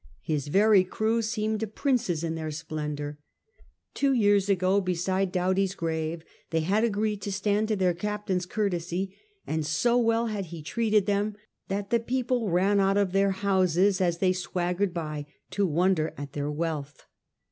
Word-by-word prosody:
His 150 -3 -2
very 200 +4 +5
crew 220 +5 0
seemed 220 -1 -2
princes 235 - 0
in 165 -1 -1
their 160 -1 -4
splendour. 150 -1 -5 0.7
Two 275 -1 +2
years 205 -4 +3
ago, 190 +1 +3
beside 185 +1 0
Doughty's 190 +1 +1
grave, 160 -1 -3 0.2
they 160 -1 +1
had 200 +7 +1
agreed 210 -2 0
to 200 - -4
stand 205 +2 +1
to 215 - +1
their 185 -3 +2
Captain's 195 0 -2
courtesy, 185 -2 -2 0.3
and 160 0 -1
so 240 +10 +2
well 230 0 +2
had 210 -4 -3
he 165 -2 -9
treated 215 +3 +1
them 205 +1 0 0.3
that 200 +1 -3
the 235 - +4
people 245 -1 -1
ran 190 +4 +3
out 195 0 +3
of 200 -3 +2
their 195 +1 +3
houses 190 -1 +2
as 175 -2 +1
they 185 0 +2
swaggered 180 +1 -1
by, 155 -4 -4 0.2
to 200 -1 +1
wonder 170 0 +1
at 140 -1 -7
their 145 0 -2
wealth. 150 -2 -4
190 Hz, 160 wpm, -27 LUFS, 170-210 Hz, 0.7 s, very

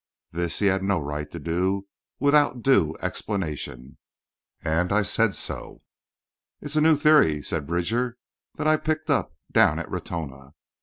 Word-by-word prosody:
This 85 0 -1
he 105 - +1
had 95 -1 +2
no 95 -2 +1
right 75 0 -4
to - - -8
do 90 +5 -1 0.3
without 145 -3 +3
due 95 - +3
explanation, 75 - -4 0.6
and 85 +4 0
I 105 +1 +3
said 110 +1 +2
so. - - -6 0.8
"It's 145 +1 -5
a 155 - +3
new 160 0 +6
theory," 145 - +4
said 75 -3 -3
Bridger, 115 +9 -1 0.4
"that - - -4
I 155 0 +4
picked 155 0 -2
up 80 - 0
down - - +4
in - - -3
Ratona. 70 -3 -6
95 Hz, 150 wpm, -25 LUFS, -, 0.8 s, new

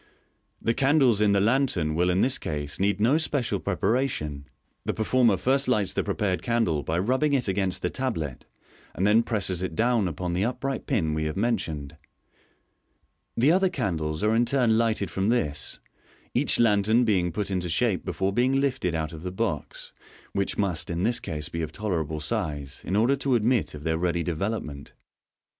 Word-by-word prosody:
The 115 - 0
candles 135 -5 +3
in 105 -1 +4
the 100 - +3
lantern 105 - +1
will 90 +3 +2
in 90 +2 +2
this 130 +1 +1
case 75 -2 -4
need 100 +1 +1
no 125 +9 +3
special 125 -10 -1
preparation. 90 - -1 0.4
The - - -2
performer 110 -1 +3
first 135 +5 +1
lights 105 -6 +1
the - - 0
prepared 95 -3 -1
candle 115 -11 +1
by 80 +3 -2
rubbing 130 +10 +1
it 130 -5 +1
against 95 -1 -1
the 90 - 0
tablet, 80 - -3 0.5
and 95 - 0
then 105 +3 +5
presses 100 -6 -1
it 95 -3 -3
down 115 -1 +2
upon 90 +2 -3
the 90 +3 0
upright 130 +3 -3
pin 90 - 0
we 80 0 -1
have 75 +2 -3
mentioned. 80 -10 -2 1.4
The 130 +6 +4
other 190 +2 +3
candles 80 - -2
are 110 +1 +3
in 120 - +4
turn 125 -4 +3
lighted 110 -3 0
from 95 +2 0
this, 75 - -1 0.5
each - - +2
lantern 110 +1 +4
being 90 -5 +1
put 100 +3 -3
into 90 -2 -1
shape 100 +3 +1
before 95 0 -1
being 130 +4 +2
lifted 130 -11 0
out 80 0 -3
of 80 - -8
the 90 +1 -4
box, 95 - -4 0.4
which 100 -1 -1
must 90 -6 -1
in 85 +1 -2
this 120 +2 +1
case 75 -8 -4
be 85 - -4
of 80 - -4
tolerable 80 -7 -2
size, 75 - -3
in 95 - 0
order 120 +6 +3
to 135 -1 +1
admit 120 -5 +1
of 75 - -9
their 80 0 0
ready 85 -1 0
development. 80 -4 -3
Fig. - - -23
231. - - -43
100 Hz, 185 wpm, -26 LUFS, 85-120 Hz, 1.4 s, then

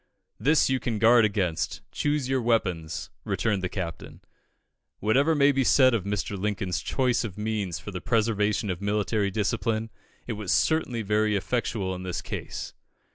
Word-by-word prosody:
"This 150 +3 +4
you 130 -1 +1
can 115 -4 -2
guard 115 +1 +6
against; 95 -6 -1
choose 145 -3 0
your 130 -1 +1
weapons," 90 -9 -1
returned 105 -4 0
the 90 - -2
Captain. 85 -4 -6 0.8
Whatever 140 +10 +2
may 145 -1 +5
be 135 -1 +1
said 130 0 +5
of 105 -5 0
Mr. 100 0 -2
Lincoln's 100 -1 -2
choice 125 -2 0
of 105 -5 -6
means 105 -6 -2
for 75 +8 -8
the 90 -2 -5
preservation 105 -2 +1
of 90 +1 -5
military 105 0 0
discipline, 110 +2 -1 0.3
it 120 - -3
was 105 -3 -3
certainly 130 -8 +1
very 105 +1 +1
effectual 100 -2 -1
in 90 - -6
this 90 -1 -4
case. - - -6
105 Hz, 160 wpm, -26 LUFS, 100-120 Hz, 0.8 s, guard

